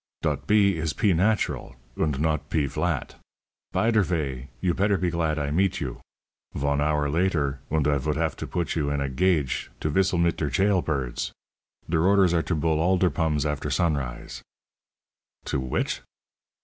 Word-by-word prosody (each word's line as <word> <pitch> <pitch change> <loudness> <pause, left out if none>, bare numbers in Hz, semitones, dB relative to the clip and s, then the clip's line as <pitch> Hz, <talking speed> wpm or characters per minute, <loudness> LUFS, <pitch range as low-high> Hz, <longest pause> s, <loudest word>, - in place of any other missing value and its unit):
"Dot - - -1
p 100 -3 +4
is 80 -1 -1
p 100 -3 +2
natural, 105 +6 0 0.2
und 75 -4 0
not 80 -1 0
p 80 -3 +1
vlat. 70 - -2 0.6
Py 115 - +2
der 110 -2 +4
vay, 70 -8 -2
you 90 +4 +1
petter 100 +2 +2
pe 90 -2 0
glad 80 -2 0
I 70 -1 -1
meet 95 +4 +1
you. 65 -6 -5 0.5
Von 70 +1 0
hour 75 -1 +1
later, 75 -4 0
und 75 -2 +1
I 70 -1 +2
vould 75 +3 -1
half 80 -2 0
to - - -5
put 85 -1 -2
you 75 -3 0
in 70 0 -1
a 70 -1 -1
gage 75 -1 +1
to 75 - -1
vistle 95 +2 +2
mit 85 0 +2
der 75 - -1
chail 95 +1 +2
pirds. 65 -6 -2 0.5
Der 80 -1 +1
orders 95 -2 +4
are 85 - +3
to 85 - -2
bull 80 0 +1
all 90 +3 +3
der 90 -2 +2
pums 75 0 0
after 75 -2 -2
sunrise." 65 -6 -2 1.0
"To - - -1
which?" 65 -1 -2
80 Hz, 180 wpm, -25 LUFS, 70-90 Hz, 1.0 s, p